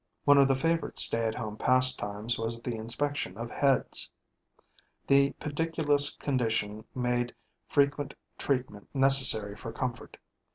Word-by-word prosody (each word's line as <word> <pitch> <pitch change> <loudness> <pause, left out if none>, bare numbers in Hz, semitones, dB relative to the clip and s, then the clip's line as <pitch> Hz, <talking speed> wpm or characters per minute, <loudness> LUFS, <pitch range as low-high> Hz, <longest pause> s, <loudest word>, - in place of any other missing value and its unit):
One 145 -1 +6
of 140 - +5
the 135 - +2
favorite 165 +4 -2
stay 115 0 +3
at 110 - -3
home 110 -3 -6
pastimes 120 -4 +1
was 115 +1 -3
the 120 +1 -5
inspection 115 -1 -2
of 115 +1 -7
heads. 140 -2 +1 1.0
The 140 0 +3
pediculous 150 -1 +2
condition 115 -5 -2
made 125 -1 -2 0.3
frequent 140 -1 0 0.2
treatment 125 -7 -3
necessary 130 -7 +4
for 115 +2 -8
comfort. 125 +1 -6
130 Hz, 125 wpm, -28 LUFS, 115-140 Hz, 1.0 s, One